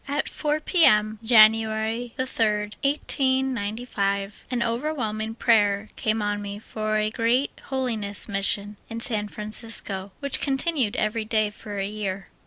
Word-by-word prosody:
At 285 +2 -1
4 300 0 -1
P. 345 +1 +3
M., 215 -3 +4
January 220 +1 +3
3d, 215 -5 0
1895, 240 -8 -1
^^ - - -1
over^vhelming 230 -3 -2
prayer 210 -3 +2
came 215 -1 0
on 205 0 -1
me 200 0 -6
for 215 0 -3
a 215 0 0
great 240 +4 +1
Holiness 230 -7 -2
Mission 200 0 +1
in 230 - -5
San 215 -3 0
Francisco, 210 -2 -1
which 280 -1 +1
continued 270 -4 0
every 215 +1 -1
day 215 -1 +1
for 210 -1 -8
a 195 - -1
year. 200 -2 -5
220 Hz, 135 wpm, -24 LUFS, 210-245 Hz, -, M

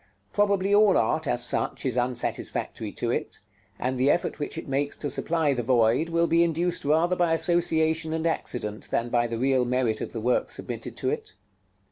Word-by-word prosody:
Probably 200 -1 +2
all 205 -2 +5
art, 155 +7 0
as 120 -2 +3
such, - - 0
is 130 -3 0
unsatisfactory 125 0 -2
to - - -2
it; - - -3 0.4
and 130 0 -2
the 135 +2 +3
effort 175 - 0
which 145 - -4
it - - -6
makes 140 +1 -1
to 145 - -3
supply 160 -3 0
the 125 - -2
void 120 +5 +2
will 170 0 +2
be 170 0 +3
induced 170 +1 -1
rather 165 +5 +2
by 175 -2 +2
association 160 -1 +1
and 160 0 -2
accident 110 -9 -3
than 120 +1 -1
by 120 0 +1
the 115 0 -4
real 130 +1 +2
merit 125 -3 0
of - - -4
the 115 - -5
work 125 +3 0
submitted - - -6
to - - -1
it. - - -5
145 Hz, 190 wpm, -26 LUFS, 125-170 Hz, 0.4 s, all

